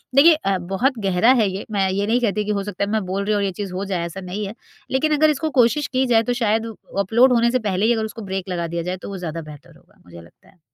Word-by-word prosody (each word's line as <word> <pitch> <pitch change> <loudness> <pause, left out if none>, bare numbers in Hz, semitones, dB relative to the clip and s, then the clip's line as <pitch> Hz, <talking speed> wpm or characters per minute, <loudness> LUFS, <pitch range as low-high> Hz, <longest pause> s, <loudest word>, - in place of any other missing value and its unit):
देखिए 315 +5 +8
अ, 195 -11 -1
बहुत 195 +9 -1
गहरा 195 +5 +4
है 210 - +3
ये। 190 +2 -5
मैं 195 -2 +1
ये 200 +2 -1
नहीं 235 +3 +2
कहती 210 -2 0
कि 210 - -1
हो 200 -1 -1
सकता 200 -1 -4
है 200 - -2
मैं 220 0 +1
बोल 195 +2 -2
रही 215 - +1
हूँ 210 - +2
और - - 0
ये 195 - -1
चीज़ 190 0 -6
हो 195 +2 -3
जाए, 180 -3 -2
ऐसा 180 +3 -7
नहीं 185 +3 -4
है। 200 - -7 0.4
लेकिन 305 +4 +1
अगर 310 +1 +4
इसको 305 +1 -1
कोशिश 265 +5 +3
की 260 0 0
जाए 230 -2 +4
तो 245 - -1
शायद 220 +1 +1 0.3
अपलोड 235 +6 +4
होने 235 0 +3
से 255 - +1
पहले 205 -1 0
ही 240 - +4
अगर 220 -1 -1
उसको 220 +1 -8
ब्रेक 190 -1 -3
लगा 170 -2 -2
दिया 170 0 -3
जाए 185 - -3
तो - - -6
वो 195 - -5
ज़्यादा 165 -2 -5
बेहतर 150 -2 -13
होगा। - - -27
मुझे 85 -1 -12
लगता 85 - -21
है। 180 - -26
200 Hz, 295 wpm, -21 LUFS, 185-235 Hz, 0.4 s, देखिए